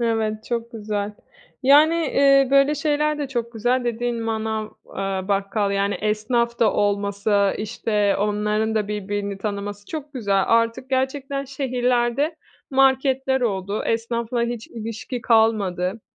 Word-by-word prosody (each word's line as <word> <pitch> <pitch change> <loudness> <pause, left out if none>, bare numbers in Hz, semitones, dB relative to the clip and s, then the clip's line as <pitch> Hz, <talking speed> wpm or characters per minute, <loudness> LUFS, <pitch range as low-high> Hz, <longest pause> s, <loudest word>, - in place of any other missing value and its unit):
Evet, 220 -2 -1
çok 235 0 -3
güzel. 210 -2 -3 0.5
Yani, 295 +5 +6
eee, 275 -4 +4
böyle 275 +2 +5
şeyler 300 0 0
de 285 -2 -3
çok 235 -3 -3
güzel, 245 +3 0
dediğin 240 0 -2
manav, 220 -1 -2 0.2
eee, 195 0 -4
bakkal, 200 +1 0
yani, 200 0 0
esnaf 235 +3 0
da 220 -3 +3
olması, 200 0 +1
işte, 210 -1 0
onların 210 +1 0
da 210 -2 0
birbirini 205 -1 -3
tanıması 205 0 -5
çok 300 -2 -6
güzel. 200 -6 +1
Artık 230 +3 +1
gerçekten 270 +1 -1
şehirlerde, 255 +2 0 0.3
marketler 265 0 +2
oldu, 200 -3 -1
esnafla 235 +1 -1
hiç 235 -1 -3
ilişki 230 +2 -6
kalmadı. 215 -4 +2
230 Hz, 125 wpm, -22 LUFS, 205-260 Hz, 0.5 s, Yani